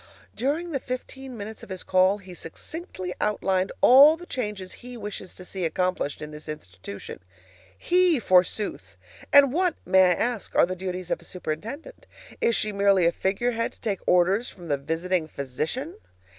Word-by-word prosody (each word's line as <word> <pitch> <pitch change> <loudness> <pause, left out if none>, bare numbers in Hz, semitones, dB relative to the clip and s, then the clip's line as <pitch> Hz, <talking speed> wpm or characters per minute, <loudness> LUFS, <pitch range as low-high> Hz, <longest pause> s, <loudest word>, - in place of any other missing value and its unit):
During 305 +8 -1
the 275 - -1
fifteen 255 0 -6
minutes 215 +1 -7
of - - -12
his 185 -1 -6
call 185 +2 +3
he 190 -3 -12
succinctly 185 - -7
outlined 190 -3 +1
all 285 +5 +8
the 350 - -11
changes 210 - -4
he 245 0 -9
wishes 205 -4 -7
to 180 - -11
see 190 0 -5
accomplished 170 -3 -1
in 150 - -7
this 150 0 -10
institution. 100 -9 -8 0.6
HE 360 - +3
forsooth! 185 +1 +1 0.3
And 275 -2 +7
what, 355 0 +2
may 190 - +5
I 180 - +4
ask, 235 +3 -2
are - - +6
the 185 +1 -4
duties 185 -1 -5
of - - -1
a - - -16
superintendent? 220 - -6 0.3
Is 230 - +3
she 215 - 0
merely 200 -3 +3
a 170 - +5
figurehead 230 +6 -1
to - - -25
take 205 -4 -1
orders 185 +6 +3
from 175 -3 -11
the 145 - +2
visiting 165 +4 -1
physician? 155 - -4
195 Hz, 170 wpm, -26 LUFS, 180-250 Hz, 0.6 s, all